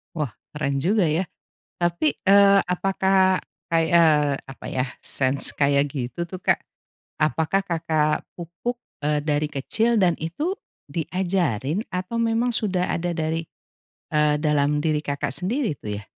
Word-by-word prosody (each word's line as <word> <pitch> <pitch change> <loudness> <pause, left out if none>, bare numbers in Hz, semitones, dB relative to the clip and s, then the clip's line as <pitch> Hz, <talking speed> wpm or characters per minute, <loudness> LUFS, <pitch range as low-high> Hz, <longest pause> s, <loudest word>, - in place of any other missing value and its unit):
Wah 150 -7 -2 0.2
keren 145 -2 -2
juga 195 -1 +3
ya, 160 +5 +1 0.6
tapi, 170 -3 +2 0.2
eee, 200 0 +7
apakah 190 0 +2 0.3
kay 165 -1 +3
eee, 150 -4 +4
apa 135 - -11
ya 125 0 -1
sense 135 +1 +1
kayak 140 0 +3
gitu 135 +6 -4
tuh 185 +2 -7
Kak, - - +3 0.6
apakah 160 +5 +2
Kakak 160 -4 0
pupuk, 185 +9 -5 0.2
eee, 150 0 +1
dari 150 0 0
kecil 220 - +1
dan 175 -3 +3
itu 295 - -3 0.3
diajarin 175 - -1
atau 185 +5 -3
memang 230 +1 +1
sudah 190 -6 0
ada 175 0 -1
dari, 160 0 -2 0.6
eee, 150 -1 +2
dalam 150 -1 +2
diri 155 -1 0
Kakak 140 -2 -2
sendiri 210 - -1
itu 105 -3 -5
ya? - - -14
165 Hz, 135 wpm, -24 LUFS, 150-190 Hz, 0.6 s, eee